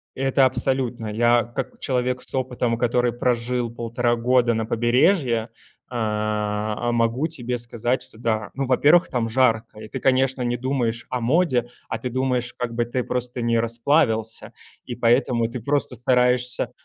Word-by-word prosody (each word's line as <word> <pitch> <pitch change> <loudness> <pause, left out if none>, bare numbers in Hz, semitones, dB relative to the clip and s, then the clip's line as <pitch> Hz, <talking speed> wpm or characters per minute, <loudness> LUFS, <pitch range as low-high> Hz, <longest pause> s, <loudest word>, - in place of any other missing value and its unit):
Это 135 0 +3
абсолютно. 125 -2 0
Я, 120 +2 +3
как 120 +4 -6
человек 125 -1 -1
с - - -8
опытом, 125 -2 -1
который 120 0 +1
прожил 120 0 -1
1,5 120 +1 -1
года 120 0 +2
на 110 0 -1
побережье, 120 - +2 0.4
э 125 - -8
а, 105 0 -1
могу 120 +5 +1
тебе 125 -6 -4
сказать, 120 +1 -2
что - - -12
да. 110 -2 -1
Ну 135 0 -2
во-первых, 145 +7 +4
там 120 -3 -1
жарко, 115 -3 +1
и 110 - -9
ты, 130 - -6
конечно, 130 0 +2
не 120 0 0
думаешь 120 -3 -2
о 125 - -2
моде, 130 -1 +2 0.2
а - - -2
ты 125 - -4
думаешь, 125 -1 -1
как 120 -1 -4
бы 120 0 +1
ты 120 +1 -2
просто 125 0 -3
не 115 0 +2
расплавился. 115 -1 0 0.3
И 120 - -5
поэтому 120 0 +2
ты 120 +2 -6
просто 140 +2 -1
стараешься, 125 +1 +1
120 Hz, 160 wpm, -23 LUFS, 115-130 Hz, 0.4 s, во-первых